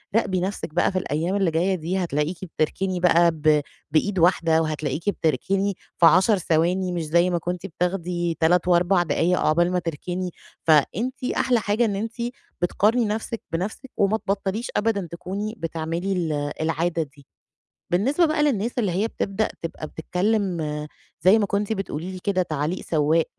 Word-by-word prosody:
راقبي 195 -5 +2
نَفْسِك 190 -4 -4
بقى 175 - +2
في 185 - 0
الأيام 165 +4 -1
اللي 195 -4 +2
جاية 180 +4 +1
دي 175 +2 -2
هتلاقيكِ 165 -1 -1 0.2
بتركني 185 +4 0
بقى 170 -1 +5
ب 155 -1 +3 0.3
بإيد 190 +5 +1
واحدة، 165 -2 +4
وهتلاقيكِ 155 +3 -2
بتركني 195 +3 0 0.2
في 170 - +5
10 190 +5 +6
ثواني 180 +2 +1
مش 170 -2 -2
زي 170 +3 +3
ما 175 - +1
كنتِ 175 +2 -4
بتاخدي 175 -1 -2
3 170 +2 +3
و4 175 +1 +4
دقايق 170 +3 +1
عقبال 175 +3 +2
ما 180 - +1
تركني، 175 +3 -4 0.3
فأنتِ 195 - +2
أحلى 245 -2 +3
حاجة 210 +3 +1
إن 205 -3 -1
أنتِ 220 +3 -3 0.5
بتقارني 215 +7 +2
نَفْسِك 220 +2 -3
بنَفْسِك 205 +10 -4
وما 205 +2 +3
تبطليش 200 +2 -2
أبدًا 205 -4 0
تكوني 200 +5 -4
بتعملي 165 +2 -3
ال 170 -4 -1 0.3
العادة 165 +1 0
دي. 140 -1 -17 0.7
بالنسبة 265 - +2
بقى 310 -1 +1
للناس 240 -6 +1
اللي 205 -7 +1
هي 200 +6 0
بتبدأ 205 0 -1
تبقى 165 -2 -5
بتتكلم 185 +3 -1 0.6
زي 190 +6 +6
ما 210 - +1
كنتِ 200 +2 -1
بتقولي 185 -3 -4
لي 185 - -6
كده 195 -2 +2
تعليق 155 +1 -2
سوّاق، 155 +1 +2
180 Hz, 160 wpm, -24 LUFS, 165-200 Hz, 0.7 s, 10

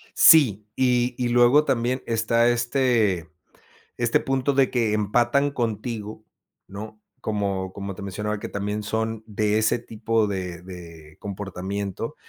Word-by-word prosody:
Sí, 110 - +6
y 125 -1 +1
y 125 -1 -1
luego 120 +5 +5
también 125 +1 0
está, 115 +1 +2
este 120 - +1 0.7
este 120 -1 +2
punto 135 +1 0
de 135 -1 +3
que 115 -4 +1
empatan 120 +7 +2
contigo, 110 -3 -4 0.4
¿no?, 105 +2 -9 0.2
como 100 -3 -2
como 100 -1 -6
te 95 - -10
mencionaba 105 +2 -3
que - - -5
también 105 +1 -3
son 110 +1 -2
de 105 0 0
ese 110 +2 +2
tipo 115 -1 -1
de 90 -3 -4
de 85 -4 -12
comportamiento 100 - -5
110 Hz, 130 wpm, -24 LUFS, 100-120 Hz, 0.7 s, Sí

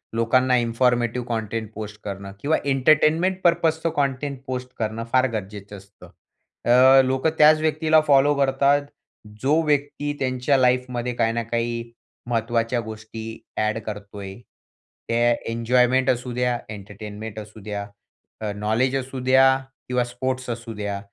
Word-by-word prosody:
लोकांना 125 +3 +3
informative 120 0 +1
content 110 -1 -3
post 105 0 -7
करणं 100 -1 -6
किंवा 155 +3 +2
एंटरटेनमेंट 155 +7 +3
पर्पजचं 165 -1 +2
कंटेंट 140 -1 -1
पोस्ट 125 0 -4
करणं 110 0 -2
फार 130 0 +4
गरजेचं 105 -1 -6
असतं. 100 +1 -16 0.6
अ, 130 +2 +7
लोकं 130 +4 +1
त्याच 155 +1 +6
व्यक्तीला 155 0 +3
फॉलो 140 0 +5
करतात, 140 +1 +3 0.6
जो 150 +5 +3
व्यक्ती 145 0 0
त्यांच्या 130 +1 +1
लाईफमध्ये 125 -1 +1
काही 115 -1 +1
ना 115 0 -1
काही 115 0 -3 0.4
महत्वाच्या 115 +1 0
गोष्टी 110 0 -8 0.3
एड 110 +1 0
करतोय. 100 -2 -7 0.7
त्या 120 +1 +2 0.2
एन्जॉयमेंट 125 +3 +2
असू 125 0 -1
द्या, 125 0 0
एंटरटेनमेंट 105 +1 -8
असू 110 0 -11
द्या, 100 -1 -4 0.6
अ, 105 -1 -2
नॉलेज 110 +6 0
असू 135 0 -4
द्या 130 +1 +5 0.3
किंवा 125 0 +1
स्पोर्ट्स 130 +1 -4
असू 115 -1 -5
द्या. 100 -1 -4
125 Hz, 130 wpm, -23 LUFS, 110-135 Hz, 0.7 s, अ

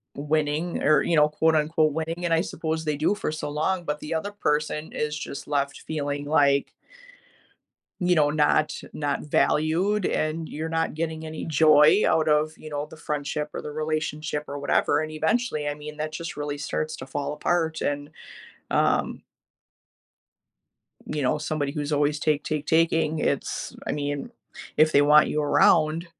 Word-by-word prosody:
winning 150 +3 -1
or, 155 +1 +5
you 170 - +1
know, 150 -1 +5
quote, 160 +1 +2
unquote, 155 0 +2
"winning," 165 +3 -3
and 170 - +1
I 165 - +3
suppose 160 -2 -3
they 150 -1 -1
do 160 +7 +1
for 180 - -3
so 155 -1 -4
long, 170 +5 -1
but 150 -1 -2
the 150 - -4
other 165 +6 -2
person 150 -4 -1
is 150 0 -2
just 140 - -7
left 140 -1 -1
feeling 145 -2 -3
like 140 -2 +2 1.3
you 180 -1 +2
know, 150 -2 +4
not 150 0 +2 0.2
not 145 -1 -2
valued, 170 +7 +1
and 155 +1 -1
you're 160 +2 -4
not 165 -1 -1
getting 160 0 -3
any 155 0 -6
joy 155 +4 +5
out 160 -1 +2
of, 150 +1 +2
you 155 - -10
know, 145 -1 -3
the - - -11
friendship 150 0 -3
or - - -4
the - - -6
relationship 155 0 -3
or 145 - -5
whatever, 145 +1 +2
and, 155 0 -4
eventually, 160 -1 0
I 145 - -2
mean, 150 +1 -9
that 155 0 -2
just 165 +1 -6
really 145 0 -4
starts 155 +2 -3
to 130 - -9
fall 145 +2 -3
apart, 160 +1 0
and, 145 0 -2 0.6
um - - +1 1.8
you 150 - -3
know, 130 - +2
somebody 150 -2 -2
who's 150 -1 -3
always 145 0 +1
take, 150 -1 +1
take, 155 -1 -2
taking, 160 -1 +2
it's - - -2
I - - 0
mean, 145 +8 -3 0.5
if 155 0 +4
they 140 - +6
want 150 +1 +6
you 150 - -1
around, 155 +2 +3
155 Hz, 170 wpm, -25 LUFS, 150-160 Hz, 1.8 s, they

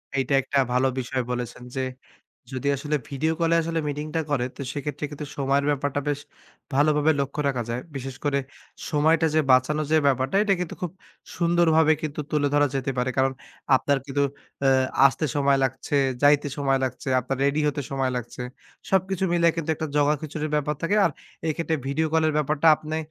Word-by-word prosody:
এইটা 135 +1 0
একটা 140 - -2
ভালো 130 +2 +3
বিষয় 130 +1 -2
বলেছেন 125 0 -4
যে 130 - -1 0.7
যদি 130 +2 -2
আসলে 150 +2 -1
ভিডিও 155 +4 0
কল 165 - +2
এ - - +5
আসলে 165 0 -1
মিটিংটা 150 +3 -3
করে 135 -4 +1
তো - - -10
সেক্ষেত্রে 145 +1 -4
কিন্তু 150 0 -6
সময়ের 140 0 +1
ব্যাপারটা 145 0 -1
বেশ 145 -1 -1 0.5
ভালোভাবে 150 +2 +3
লক্ষ্য 140 +2 -2
রাখা 125 -3 -1
যায়। 120 +1 -2 0.2
বিশেষ 135 0 -5
করে 140 -1 +2 0.5
সময়টা 160 +2 +3
যে 155 - +5
বাঁচানোর 145 +4 +3
যে 160 - +6
ব্যাপারটা 135 +4 +1
এটা 200 -2 +3
কিন্তু 180 - -3
খুব 175 - -2 0.5
সুন্দরভাবে 165 -2 +4
কিন্তু 150 -1 -3
তুলে 145 -1 +1
ধরা 145 0 +4
যেতে 135 0 -1
পারে। 125 +1 +1
কারণ 135 0 +3 0.4
আপনার 140 +1 +1
কিন্তু 140 +1 0 0.4
অ্যা 135 - +4 0.4
আসতে 140 +3 -1
সময় 140 -1 +3
লাগছে, 130 +2 -2 0.3
যাইতে 145 0 +5
সময় 135 -1 +2
লাগছে, 130 - -4
আপনার 130 +2 -3
রেডি 140 +2 +2
হতে 145 - -2
সময় 135 -1 0
লাগছে। 125 +1 -6 0.5
সবকিছু 190 0 +1
মিলায়ে 170 -1 +3
কিন্তু 165 -1 -3
১ - - -18
টা - - 0
জগাখিচুড়ির 150 +1 0
ব্যাপার 150 +1 0
থাকে। 200 +5 +1
আর - - +3 0.4
এক্ষেত্রে 160 0 -1
ভিডিও 155 +4 0
কল 160 - +3
এর 155 - 0
ব্যাপারটা 150 +1 0
আপনে 155 +1 -5
145 Hz, 180 wpm, -25 LUFS, 135-155 Hz, 0.7 s, যে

